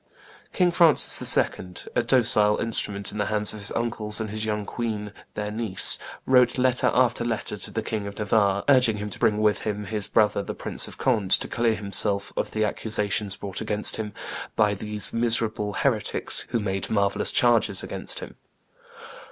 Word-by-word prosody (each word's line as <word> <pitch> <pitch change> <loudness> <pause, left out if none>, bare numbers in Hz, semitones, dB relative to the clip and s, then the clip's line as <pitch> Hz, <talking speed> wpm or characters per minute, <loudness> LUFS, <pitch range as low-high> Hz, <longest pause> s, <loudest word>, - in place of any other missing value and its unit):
King 180 -2 +1
Francis 170 -3 +5 0.2
II., - - +4 0.5
a - - +3
docile 110 -4 +3
instrument 100 -3 -2
in 105 - -7
the 105 - -1
hands 105 -1 +3
of 105 - -8
his 100 - -1
uncles 110 -2 0
and 110 -2 -4
his 110 0 -3
young 105 -1 -3
queen 105 -4 -5 0.2
their 105 0 -4
niece, 110 -3 -1 0.3
wrote 125 -1 +3
letter 130 0 +2
after 120 -2 +1
letter 120 -1 -4
to - - -6
the - - -4
King 105 -2 -4
of 100 - -9
Navarre, 100 -2 +1
urging 130 -6 +4
him 105 0 -6
to - - -5
bring 105 - +2
with 105 -1 +2
him 105 -1 -4
his 105 0 -1
brother 105 -1 +1
the - - -7
Prince - - 0
of - - -10
Conde 110 -8 0
to - - +4
clear 115 -2 0
himself 100 0 +1
of - - -2
the 110 - -2
accusations 105 -1 -1
brought 100 -2 -6
against 105 0 +1
him 110 -1 -5 0.4
"by 105 -1 +2
these 105 +1 -2
miserable 115 -3 -1
heretics, - - 0
who 115 - -1
made 95 -2 -3
marvellous 100 -2 +2
charges 115 -5 +2
against - - -4
him. - - -10
105 Hz, 180 wpm, -24 LUFS, 105-115 Hz, 0.5 s, Francis